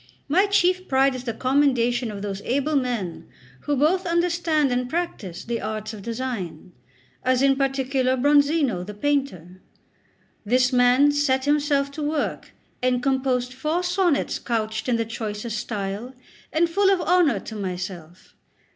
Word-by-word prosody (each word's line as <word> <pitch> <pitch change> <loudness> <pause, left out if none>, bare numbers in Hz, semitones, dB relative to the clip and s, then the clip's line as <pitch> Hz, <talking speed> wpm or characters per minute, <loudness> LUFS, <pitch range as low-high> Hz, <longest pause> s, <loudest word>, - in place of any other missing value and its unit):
My 370 +8 +3
chief 370 -2 +2
pride 270 0 +3
is 255 0 -7
the 230 - -2
commendation 255 -3 +1
of 205 -1 -6
those 200 -1 -4
able 280 +6 0
men 240 - -2 0.3
who 290 - -1
both 335 +7 +2
understand 335 -4 +1
and 250 0 -1
practise 265 - -4
the 235 0 -3
arts 215 +1 -4
of 210 - -8
design 225 -8 -5 0.5
as 255 +1 +2
in 275 0 +4
particular 265 -1 0
Bronzino, 285 - +3
the 210 +2 -8
painter; 205 - -2 0.8
this 250 +4 +2
man 250 +3 +5
set 280 -2 +1
himself 285 -1 +1
to 305 - -7
work, 295 0 -2 0.3
and 250 0 +1
composed 260 -2 0
four 310 +7 -1
sonnets 355 -4 +1
couched 220 0 -2
in 245 - +3
the 230 0 0
choicest 220 -1 -4
style, 210 +4 -5 0.4
and 335 +2 +2
full 390 +4 +2
of 385 - +2
honour 335 - +3
to 220 - -8
myself. 180 -3 -6
255 Hz, 145 wpm, -24 LUFS, 220-290 Hz, 0.8 s, man